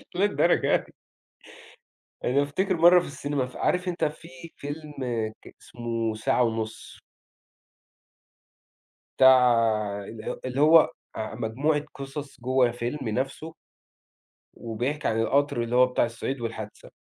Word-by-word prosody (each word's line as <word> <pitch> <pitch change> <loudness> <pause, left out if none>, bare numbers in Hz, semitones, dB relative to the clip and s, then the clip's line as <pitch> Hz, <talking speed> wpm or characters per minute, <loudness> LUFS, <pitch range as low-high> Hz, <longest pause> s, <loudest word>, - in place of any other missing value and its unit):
للدرجة 190 -2 +2
دي! - - -4 1.3
أنا 135 +3 +2
افتكر 185 +6 -1
مَرّة 175 +2 +7
في 175 - -5
السينما 140 -1 -2
ف 125 - -13
عارف 180 +1 0
أنت 180 -1 -2
في 155 +2 -5 0.3
فيلم 150 +1 -7 0.5
ك - - -15
اسمه 115 -2 -3
ساعة 110 +3 +1
ونُص. 110 -1 -4 2.2
بتاع 130 -1 +8 0.7
ال 110 +3 -7
اللي 130 +2 -1
هو 155 +2 +6 0.2
آآ 110 0 -5
مجموعة 145 +7 -1
قصص 140 0 -8
جوة 125 0 +2
فيلم 120 +2 -4
نفْسه 135 +7 -3 1.0
وبيحكي 125 +6 -3
عن 110 0 0
القطر 135 +1 +1
اللي 120 +1 -3
هو 125 0 +7
بتاع 125 -1 +1
الصعيد 120 +3 -5
والحادثة. 110 -2 -7
130 Hz, 120 wpm, -26 LUFS, 115-150 Hz, 2.2 s, بتاع